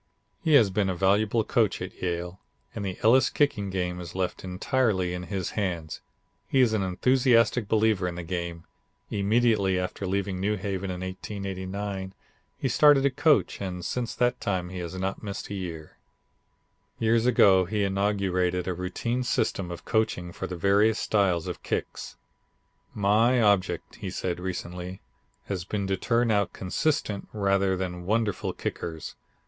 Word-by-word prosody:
He 160 -3 +4
has 110 -8 +6
been 100 0 +1
a 95 - -1
valuable 105 +5 +2
coach - - +1
at - - -6
Yale 90 0 -3 0.3
and 100 - -5
the 95 -2 -4
Elis' 125 +4 +5
kicking 115 -9 +1
game 90 -1 -2
is 85 0 -9
left 95 -1 -2
entirely 95 -1 0
in 90 0 -5
his 95 -3 -2
hands. 85 -6 -3 0.5
He 135 - +2
is 120 -4 +4
an 110 - +1
enthusiastic 115 +3 +3
believer 110 -4 +2
in 90 - -4
the 90 - -5
game. 85 -1 -4 0.5
Immediately 105 -2 +2
after 90 +1 -3
leaving 95 0 -1
New 105 +3 +1
Haven 100 -1 -3
in 90 -1 -4
1889 95 0 -5 0.4
he - - -1
started 140 +2 +5
to 140 - +3
coach 145 -1 +2
and 90 -2 -4
since 120 +2 -2
that 125 0 +1
time 90 -4 -1
he 95 0 -6
has 85 +1 -5
not 95 +1 -3
missed 100 -1 -6
a - - -2
year. 85 -5 -7 1.0
Years 115 +1 +2
ago 95 -6 +5
he 105 +3 -1
inaugurated 95 -2 0
a 90 - 0
routine 90 +8 -2
system 100 -6 -1
of 85 0 -8
coaching 110 -6 0
for - - -5
the 90 - -5
various 100 +5 +3
styles 95 -6 +1
of - - -5
kicks. - - -4 0.8
"My 110 +5 +3
object," 100 -4 +1
he - - -5
said 90 -1 -3
recently, 90 0 -5 0.5
"has 95 -3 -3
been 100 +2 -3
to 95 0 0
turn 115 +4 +1
out 100 -2 +1
consistent 105 +1 -1
rather 100 -2 +1
than 90 -1 -4
wonderful 110 -2 0
kickers. 80 -2 -5
95 Hz, 160 wpm, -27 LUFS, 90-110 Hz, 1.0 s, has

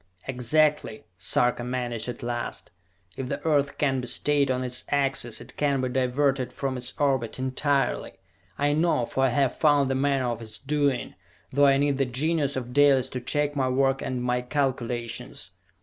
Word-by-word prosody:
"Exactly!" 135 0 +1
Sarka 120 +6 +1
managed 120 -2 -3
at 120 - -7
last. 120 0 -4 0.4
"If 130 -1 -5
the - - -2
Earth 145 -3 +1
can 135 -3 +1
be 125 - -6
stayed 145 +3 +2
on 130 0 0
its 125 0 -2
axis, 135 -4 0
it 120 +1 -12
can 140 -2 +1
be 130 0 -1
diverted 130 +1 0
from 135 -2 -3
its 125 0 -5
orbit 135 -5 0
entirely! 130 0 0 0.4
I 145 +1 +2
know, 155 -6 +2
for 135 - -1
I - - +3
have 135 0 +1
found 145 -3 +3
the - - +2
manner 135 -1 +1
of 115 -1 -5
its 110 -1 -7
doing, 145 -2 -1 0.4
though 145 +1 +5
I 135 0 +5
need 140 -1 +1
the 135 - +2
genius 145 +3 0
of 125 -1 -5
Dalis 135 -2 +4
to 125 - -5
check 145 +3 0
my 130 -2 +1
work 135 +1 +1
and 125 -1 -3
my 125 0 0
calculations! 125 -3 -3
130 Hz, 180 wpm, -26 LUFS, 125-145 Hz, 0.4 s, though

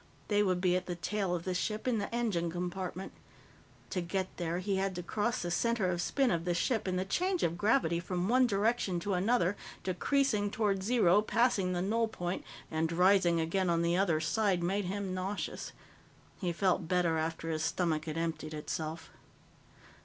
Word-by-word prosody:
They 205 -1 +3
would 185 -3 +2
be 180 -1 +3
at 180 0 -2
the 175 - -2
tail 190 +1 -1
of 170 - -4
the 185 - -2
ship, 215 +6 -2
in 235 -4 +2
the 200 - -4
engine 210 -8 0
compartment. 180 +2 -4 0.8
To 180 - -1
get 185 +2 -3
there, 170 -1 -2
he 190 +1 -1
had 190 -1 -1
to 175 - -4
cross 210 +5 -1
the 175 - -2
center 215 0 +1
of 175 -1 -1
spin 270 +7 +1
of 170 -2 0
the 175 0 0
ship, 225 +1 0
and 185 -1 0
the 185 - -1
change 365 - 0
of 170 - +1
gravity 175 -3 +2
from 180 +1 -2
one 250 +2 +4
direction 205 -3 +1
to 200 +3 -1
another, 190 0 +2 0.3
decreasing 210 +3 +1
toward 200 -2 0
zero, 210 -3 +4
passing 210 -5 +2
the 175 0 -1
null 225 +4 +1
point, 180 -4 -4 0.3
and 160 +1 0
rising 180 -1 +4
again 175 +3 0
on 170 0 +2
the 170 +1 +2
other 180 -4 +2
side, 180 +3 +1
made 195 +3 0
him 195 0 -3
nauseous. 190 +2 -4 0.7
He 180 -3 -1
felt 180 -1 +1
better 170 -2 +2
after 165 +1 -2
his 155 -1 -1
stomach 160 -2 0
had 155 0 -4
emptied 160 -2 -3
itself. 155 +1 -5
185 Hz, 190 wpm, -32 LUFS, 170-205 Hz, 0.8 s, one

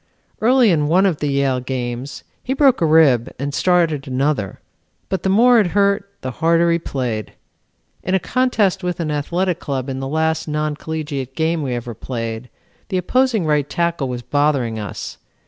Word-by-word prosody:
Early 245 -1 +4
in 150 -3 +1
one 180 +5 +4
of 180 -6 +1
the 150 - -1
Yale 140 -2 +1
games 125 +1 -5 0.2
he 265 - -2
broke 270 -6 +4
a 165 - +3
rib 145 -7 +4
and 140 +2 -4
started 165 -5 +1
another, 130 -6 -1 0.5
but 190 - -1
the 190 - 0
more 235 +4 +5
it 205 - +3
hurt, 200 0 +2
the 130 - -4
harder 170 +4 +2
he 170 - +2
played. 125 -8 -4 0.7
In 185 - 0
a - - +3
contest 210 -6 +1
with 180 0 -2
an 160 -3 -2
athletic 170 +4 -1
club 135 -1 -3
in 130 0 -4
the 135 - -4
last 160 +3 0
non 150 0 -1
collegiate 145 -4 -5
game 160 0 0
we 130 -4 -2
ever 120 0 -5
played, 115 +1 -5 0.4
the 190 - 0
opposing 230 +1 +1
right 150 -2 +1
tackle 170 -5 -1
was 120 -1 -5
bothering 140 -5 0
us. 105 -4 -7
155 Hz, 180 wpm, -19 LUFS, 130-180 Hz, 0.7 s, more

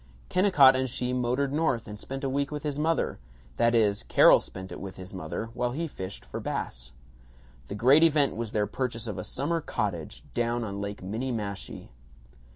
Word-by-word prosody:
Kennicott 150 -9 +6
and 130 0 0
she 125 +1 -1
motored 125 +3 0
North 150 -7 0
and 105 0 -8
spent 135 +4 -6
a 135 - 0
week 140 +1 0
with 150 -1 -5
his 150 -1 -2
mother 160 +2 0 0.4
that 115 0 +3
is, 105 -3 +3
Carol - - +6
spent 95 0 -9
it - - -7
with 95 -1 -7
his 95 +1 -10
mother, 95 +5 -5
while 120 0 -1
he 165 +4 -2
fished 95 -9 -7
for - - -6
bass. - - -4 0.8
The 100 - -5
great 130 +8 +5
event 150 -4 +4
was 115 -1 -4
their 105 -1 +1
purchase 120 -1 -3
of 105 -5 -4
a - - -4
summer 165 +5 -1
cottage, 95 - -3
down 120 0 0
on 100 -2 -4
Lake 100 -1 -5
Minniemashie. 105 -1 -4
120 Hz, 185 wpm, -28 LUFS, 100-140 Hz, 0.8 s, Kennicott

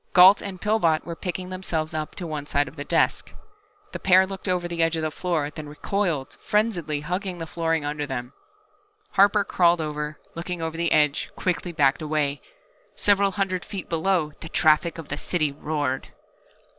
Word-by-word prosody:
Gault 185 +2 +8
and 190 -2 -6
Pillbot 190 -7 +2
were 170 - -5
picking 180 +1 -4
themselves 165 -4 -3
up 155 -1 -4
to 180 - -4
one 150 -3 -5
side 145 -1 +1
of - - -11
the 145 - -5
desk. - - +1 0.6
The - - -5
pair 190 0 +6
looked 195 +1 -7
over 180 -1 0
the 170 -1 -2
edge 165 0 +2
of 160 - -2
the 155 - -1
floor, 155 -4 -1
then 150 0 -8
recoiled, 150 -3 -2
frenziedly 180 -9 0
hugging 180 +3 -3
the 165 - -5
flooring 165 -2 -1
under 145 0 -3
them. 125 -1 -5 0.8
Harper 200 +1 +5
crawled 175 -3 +3
over, 150 -1 -3 0.2
looked 170 +2 -7
over 165 -2 -3
the 170 0 0
edge, 150 -2 +2
quickly 180 -1 -1
backed 140 -2 +2
away. 150 -2 -1 0.5
Several 200 -1 +3
hundred 190 -2 -1
feet 195 -4 -7
below, 165 -1 +1
the 165 - -7
traffic 160 +1 +3
of 165 -3 -8
the 145 - -3
city 155 -5 0
roared! 145 -2 -2
165 Hz, 180 wpm, -25 LUFS, 150-185 Hz, 0.8 s, Gault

